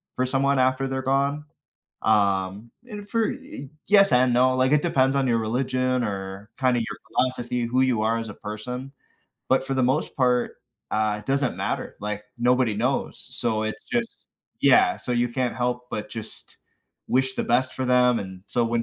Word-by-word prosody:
for 130 - +1
someone 135 +1 +1
after 130 +1 +2
they're 130 0 -2
gone, 140 +3 0 0.6
um, 100 0 +1 0.2
and 205 -1 -8
for 225 0 +1
y 135 +1 -10 0.2
yes 200 -4 +6
and 125 0 +4
no, 130 +1 +4
like 130 +2 +2
it 150 - +4
depends 135 -5 +2
on 135 -1 +2
your 115 -1 +2
religion 130 +2 0
or 100 +1 -5
kinda 125 -2 +2
your 115 - -4
philosophy, 125 -1 -1
who 125 +2 +1
you 120 -4 +1
are 115 +1 +1
as 115 -1 -5
a 105 - -8
person. 125 +6 -6 0.6
But 130 0 +3
for 135 - -2
the 130 - +1
most 135 +5 0
part, 125 -2 +1 0.3
uh, 105 -1 +1
it - - -18
doesn't 135 -2 +1
matter, - - -3
like, 105 0 -4
nobody 125 -2 +2
knows. 125 +6 -1
So, 110 -2 -1
it's 110 - -4
just 235 -1 -4 0.3
Yeah, 365 -1 +5
so, 125 - -4
you 120 0 +1
can't 125 0 -1
help 125 0 -2
but 105 0 -4
just 110 -1 -8 0.5
wish 130 +1 +1
the - - -1
best 130 +2 +1
for 130 - -2
them 125 -1 +4
and 95 -1 -8
so, 120 -1 +1
when 115 0 0
125 Hz, 185 wpm, -24 LUFS, 115-130 Hz, 0.6 s, yes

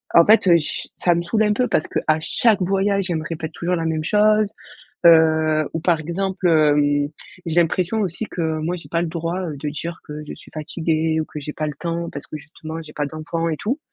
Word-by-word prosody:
en 170 - +8
fait, 215 -2 +5
heu, - - +6
ch 150 - -2
ça 175 -1 +2
me 170 - 0
saoule 215 +5 +1
un 210 - +2
peu 250 +4 +1
parce 155 - +1
qu'à 155 - +1
chaque 210 +4 +3
voyage 195 +1 +1
elle 170 - 0
me 155 - -5
répète 160 -1 -5
toujours 175 +2 -1
la 165 - -2
même 155 -1 -1
chose, 210 +2 +3 0.5
heu, 160 -2 +5
ou - - 0
par 165 -1 +2
exemple, 185 +3 -1
hem, 145 -2 +3 0.4
j'ai 165 +1 +3
l'impression 180 +6 0
aussi 195 +2 -2
que, 160 -4 -2
moi, 170 +3 -2
j'ai 170 - -10
pas 170 - 0
le 175 - -1
droit, 170 +2 -3
heu, 150 -3 -5
de 150 +2 -4
dire 165 +3 -5
que 150 0 -7
je - - -7
suis - - -15
fatiguée 160 0 -1
ou - - -1
que 150 - -8
j'ai 150 +1 -6
pas 155 0 -3
le 150 - -5
temps 170 0 -3
parce 140 - -8
que 155 - -7
justement 160 +2 -8
j'ai 155 - -12
pas 145 -1 -1
d'enfants 160 +2 -3
et 155 - -1
tout. 250 +8 -2
165 Hz, 235 wpm, -21 LUFS, 155-180 Hz, 0.5 s, en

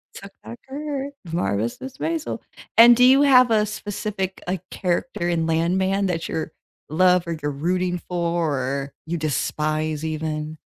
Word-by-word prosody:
She - - -7
took 200 0 -11
back 235 - -9
her 280 0 -4 0.2
Marvelous 115 - -1
Mrs. 265 0 -8
Maisel. 325 -1 -2 0.4
And 235 +1 +9
do 250 - +4
you 265 +3 +7
have 255 -3 +6
a 215 -1 +3
specific, 205 -2 -4
like, 180 -1 -2
character 180 0 -2
in 165 -2 0
Landman 190 +4 +1
that 170 -3 -2
you're 160 0 -3 0.4
love 180 +2 +3
or 170 -1 -3
you're 145 - -1
rooting 180 +5 -1
for, 170 -4 0
or 135 +2 -3
you 170 +1 -2
despise 155 +1 -1
even? 155 0 -3
175 Hz, 155 wpm, -23 LUFS, 155-210 Hz, 0.4 s, And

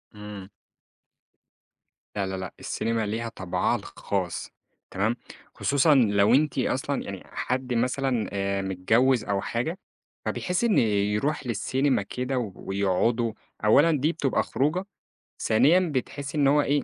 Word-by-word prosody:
إمم. 105 -2 -9 1.7
لا 100 -1 -1
لا 95 0 -3
لأ، 95 -1 -6
السينما 115 -1 -1
ليها 115 +3 -3
طَبعها 95 -5 -1
الخاص - - -4 0.4
تمام، 110 +5 0 0.4
خصوصًا 145 +2 +3
لو 105 -3 +4
أنتِ 145 -2 +1
أصلًا - - -1
يعني - - -7
حد 130 0 -3
مثلًا 125 0 0
آآ، 100 0 -1
متجوز 110 +6 +2
أو 100 -1 0
حاجة، 125 - -2 0.5
فبيحس 180 +4 -1
إن 230 -3 +3
يروح 105 +6 0
للسينما 130 +3 +1
كده 125 +5 -3 0.2
ويقعدوا، 100 +4 0 0.3
أولًا 145 +10 +6
دي 150 +1 +2
بتبقى 145 -6 0
خروجة، 160 +8 0 0.6
ثانيا 135 +11 +5 0.2
بتحسّي 140 +3 -3
إن 140 - +4
هو 145 +2 +5
إيه 145 0 +1
120 Hz, 125 wpm, -26 LUFS, 105-140 Hz, 1.7 s, أولًا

